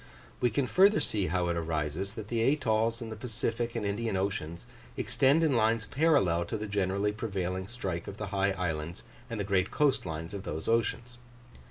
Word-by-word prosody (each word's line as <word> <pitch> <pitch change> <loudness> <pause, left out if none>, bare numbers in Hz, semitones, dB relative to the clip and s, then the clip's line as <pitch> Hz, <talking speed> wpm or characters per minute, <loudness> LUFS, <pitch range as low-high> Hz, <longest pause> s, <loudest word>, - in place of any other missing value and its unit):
We 125 - +3
can 130 +5 0
further 195 +9 +5
see 100 -3 0
how 90 +2 0
it 85 - 0
arises 80 +4 -2
that 110 -2 -7
the 115 -1 0
atolls 115 -3 +2
in 115 - -7
the - - -4
Pacific 115 +1 -2
and 115 -3 -2
Indian 105 0 -1
Oceans 85 -4 -3 0.3
extend 140 +5 +3
in 155 -4 +3
lines 110 -1 +2
parallel 130 - +3
to 110 - -3
the 105 - -4
generally 100 0 0
prevailing 95 -4 -3
strike 95 -7 -4
of 100 - -7
the 105 -3 -4
high 100 0 +2
islands 85 -2 -3 0.3
and 105 -4 -3
great 95 -2 +1
coast 145 -3 +2
lines 80 +2 -5
of 100 - -4
those 80 -4 -5
oceans. 115 +1 0
105 Hz, 185 wpm, -30 LUFS, 95-115 Hz, 0.3 s, further